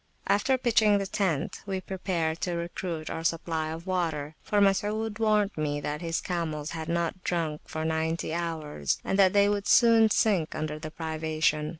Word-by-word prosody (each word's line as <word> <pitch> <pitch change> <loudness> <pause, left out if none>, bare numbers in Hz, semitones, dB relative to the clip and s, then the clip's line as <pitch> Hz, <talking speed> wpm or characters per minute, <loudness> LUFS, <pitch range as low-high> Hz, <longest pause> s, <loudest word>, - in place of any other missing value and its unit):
After 260 +6 +2
pitching 220 -4 +4
the 200 - -1
tent, 190 -7 -1
we 190 -1 -1
prepared 175 -4 -2
to 180 -2 -1
recruit 170 -1 -4
our 165 - -4
supply 165 -1 -1
of 165 +2 -6
water; 160 -6 -1
for 210 - 0
Masud 210 +2 +1
warned 215 -2 +2
me 150 -2 -1
that 150 +1 -4
his 165 -1 -1
camels 160 -4 -3
had 160 -1 -5
not 170 +2 -1
drunk 160 -4 -1
for 155 0 -4
ninety 160 0 -1
hours, 165 -3 -2
and 195 - -1
that 190 -2 +6
they 200 0 +5
would 205 -1 -1
soon 230 -2 +6
sink 195 -7 +2
under 155 0 -3
the 155 0 -6
privation. 155 -1 -1
170 Hz, 175 wpm, -28 LUFS, 155-200 Hz, -, that